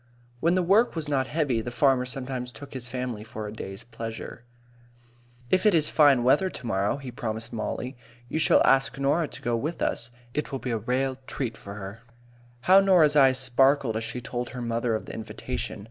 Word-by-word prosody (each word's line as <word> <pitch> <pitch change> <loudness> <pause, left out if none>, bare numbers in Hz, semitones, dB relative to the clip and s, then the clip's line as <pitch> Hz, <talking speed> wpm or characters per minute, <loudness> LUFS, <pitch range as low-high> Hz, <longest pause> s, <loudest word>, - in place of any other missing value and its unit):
When 170 +5 +2
the 185 - +2
work 205 +6 +3
was 160 -2 -2
not 135 -2 0
heavy, 140 -6 0
the 120 - -5
farmer 130 0 +2
sometimes 125 -1 -4
took 140 +2 -11
his 125 -2 -5
family 125 -4 -4
for 110 -1 -7
a 105 - -7
day's 95 0 -7
pleasure. 115 -1 -7 1.1
"If 185 - +3
it 210 -4 +5
is 155 -2 +4
fine 140 -5 +5
weather 145 +9 +3
to 130 - -8
morrow," 100 +1 0
he 135 -3 -8
promised 115 -1 -5
Mollie, 125 +4 -4 0.3
"you 160 - -2
shall 155 - +4
ask 135 0 +3
Norah 145 +4 +1
to - - -10
go 120 -1 0
with 150 +9 -3
us. 115 - 0 0.2
It 150 - -3
will 135 - -2
be 130 -1 -4
a 115 - 0
rale 130 +4 -1
treat 120 -4 -3
for 100 -2 -10
her." 105 +2 -8 0.6
How 185 +8 +7
Norah's 175 -6 +5
eyes 135 -3 +6
sparkled 130 -1 +3
as 110 - -2
she 115 +2 -4
told 120 0 -4
her 125 -1 -7
mother 115 0 0
of 110 - -4
the - - -8
invitation! 110 - -5
125 Hz, 205 wpm, -26 LUFS, 115-145 Hz, 1.1 s, How